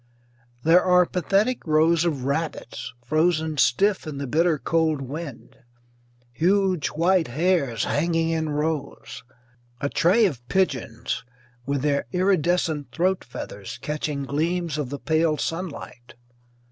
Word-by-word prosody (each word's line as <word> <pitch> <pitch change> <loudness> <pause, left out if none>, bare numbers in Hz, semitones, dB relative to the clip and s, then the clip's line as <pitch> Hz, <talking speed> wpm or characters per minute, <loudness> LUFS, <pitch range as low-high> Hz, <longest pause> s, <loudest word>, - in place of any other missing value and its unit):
There 170 +3 +5
are 180 -1 +5
pathetic 200 +6 0
rows 160 +2 +3
of 145 -7 -1
rabbits, 140 -4 -3
frozen 155 +1 +1
stiff 195 +10 +2
in 150 -2 -5
the 140 - -3
bitter 160 +4 +2
cold 160 +2 +1
wind; 140 0 -7 0.8
huge 185 +2 +2
white 170 +1 +2
hares 140 -4 +1
hanging 165 +2 0
in 160 -1 -1
rows; 150 -1 -3 0.6
a 140 - -1
tray 200 +10 +4
of 140 - -2
pigeons 125 -12 -1 0.4
with 140 -1 -1
their 145 -1 0
iridescent 175 -5 +1
throat 185 +2 0
feathers 100 -5 -8
catching 150 -1 -3
gleams 160 +3 -1
of 140 -4 -3
the 145 - -4
pale 160 +1 +1
sunlight. 165 -9 -5
160 Hz, 120 wpm, -24 LUFS, 140-175 Hz, 0.8 s, There